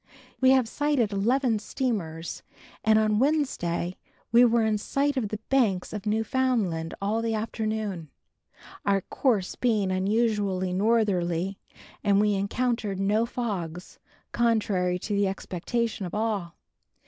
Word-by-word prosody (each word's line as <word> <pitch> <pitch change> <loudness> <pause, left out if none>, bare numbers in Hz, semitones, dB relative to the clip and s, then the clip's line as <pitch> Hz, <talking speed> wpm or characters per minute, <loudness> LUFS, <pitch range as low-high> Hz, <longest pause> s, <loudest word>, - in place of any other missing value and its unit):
We 260 - +5
have 260 -3 +4
sighted 285 -4 0
eleven 230 +3 +2
steamers 190 -9 -3 0.4
and 220 0 +5
on 215 -1 +2
Wednesday 240 - 0 0.3
we 235 +1 +7
were 235 -1 +4
in 215 -1 +1
sight 280 +6 0
of 235 -6 -1
the 215 - -3
banks 220 -10 +1
of 210 0 -5
Newfoundland 220 -7 0
all 210 +3 0
the 225 -1 -1
afternoon, 215 -6 -3 0.7
our 195 -1 +2
course 210 -3 0
being 215 -6 +1
unusually 195 -2 0
northerly 195 -3 +1 0.4
and 200 -1 +4
we 210 0 +3
encountered 205 0 -1
no 210 +4 +2
fogs, 180 -9 -5 0.3
contrary 205 -6 +1
to 205 +3 -4
the 200 0 +2
expectation 195 +3 -2
of 175 - -7
all. 210 -6 -2
210 Hz, 125 wpm, -27 LUFS, 190-235 Hz, 0.7 s, we